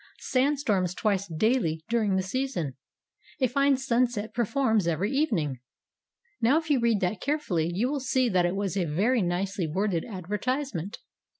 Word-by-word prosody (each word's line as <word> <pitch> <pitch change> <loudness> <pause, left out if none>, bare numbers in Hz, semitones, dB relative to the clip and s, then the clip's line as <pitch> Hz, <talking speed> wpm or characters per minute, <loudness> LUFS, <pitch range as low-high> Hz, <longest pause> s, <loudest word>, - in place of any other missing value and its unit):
Sandstorms 255 -10 +1
twice 200 -2 0
daily 165 -2 0
during 220 -4 +1
the 190 - +1
season. 190 - -2 0.6
A 260 - +3
fine 275 +2 +3
sunset 240 -4 0
performs 230 -4 +1
every 170 +5 0
evening." 195 - 0 0.8
Now 255 +7 +4
if 320 -1 -2
you 275 - +4
read 235 -3 +2
that 180 +1 -1
carefully 210 - 0
you 205 +8 0
will 285 +1 -1
see 260 -1 +1
that 185 -5 +2
it 175 - -2
was 195 -2 -2
a 185 -3 +1
very 210 +11 +1
nicely 185 +1 -1
worded 180 +1 0
advertisement. 210 - -3
210 Hz, 155 wpm, -27 LUFS, 180-255 Hz, 0.8 s, Now